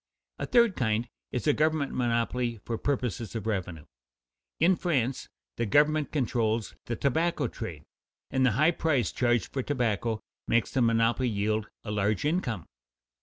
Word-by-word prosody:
A - - -3
third 235 -5 +4
kind 115 0 0 0.2
is 125 - -3
a 150 - +4
government 155 -2 +1
monopoly 120 0 0
for 115 - -2
purposes 120 -6 -2
of 110 -2 -3
revenue. 90 -8 -3 0.7
In 180 +3 +5
France, 135 -8 -1 0.3
the 115 - 0
government 150 +5 +3
controls 115 -5 0
the 120 - -1
tobacco 160 +8 +1
trade, - - -7 0.5
and 130 - +2
the 125 -4 +4
high 155 +8 +4
price 145 - +1
charged 120 -1 +1
for 135 - 0
tobacco 115 -5 -1 0.3
makes 120 - +2
the 130 - +1
monopoly 115 +2 +3
yield 105 0 0 0.2
a 105 - -5
large 105 +3 0
income. 135 - -1
120 Hz, 150 wpm, -28 LUFS, 110-145 Hz, 0.7 s, In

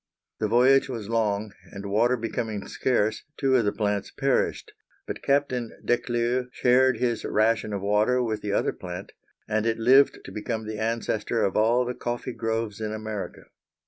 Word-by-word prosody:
The 110 - +1
voyage 130 +5 +4
was 115 -5 -5
long, 105 -2 0 0.2
and 100 0 -8
water 115 +5 +2
becoming 110 -2 -3
scarce 110 -4 0
two 135 -2 +2
of 120 -4 +3
the 105 - +2
plants 105 -2 -1
perished, 135 -2 0 0.3
but - - -6
Captain 135 -4 0
Declieux 120 +1 0
shared 125 0 +3
his 120 -1 -1
ration 110 0 +1
of 100 -1 -3
water 105 +5 +2
with 110 -3 -2
the 105 - -3
other - - +1
plant, 90 +1 -8 0.4
and 110 +1 0
it 115 - +1
lived 130 +5 +5
to - - -8
become 110 +1 -4
the 110 0 -5
ancestor 115 0 -1
of 95 - 0
all 115 +3 +3
the 125 - -2
coffee 120 +1 -4
groves 115 -2 -3
in 110 -1 -2
America. 110 -2 -5
115 Hz, 170 wpm, -26 LUFS, 105-125 Hz, 0.4 s, lived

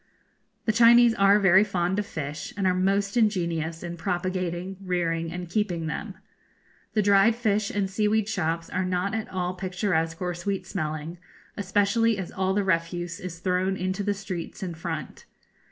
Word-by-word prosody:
The 220 - +3
Chinese 235 +1 +7
are 200 -1 +5
very 190 0 +6
fond 190 -1 0
of 205 - -3
fish, 145 -2 -5
and 200 - 0
are 185 - +4
most 195 +3 +1
ingenious 170 -7 0
in 175 0 -5
propagating, 180 +1 -2
rearing, 165 -3 -1
and 180 +1 -5
keeping 175 -3 -1
them. 160 - -4 0.8
The 215 - +3
dried 200 +3 +5
fish 215 -3 0
and 200 -1 -1
seaweed 210 +2 +1
shops 165 -5 -1
are 185 - -1
not 185 +2 -1
at 220 -1 -3
all 180 -1 -2
picturesque 180 -3 -1
or 180 -1 -2
sweet 190 +3 -3
smelling, 155 -1 -4 0.4
especially 205 +3 +2
as 190 -3 -5
all 190 0 0
the 205 - +2
refuse 175 -1 -1
is 180 -2 -6
thrown 185 +2 0
into 185 +2 -2
the 205 0 0
streets 190 -2 -6
in 180 -2 -3
front. 160 -3 -6
185 Hz, 165 wpm, -26 LUFS, 175-200 Hz, 0.8 s, Chinese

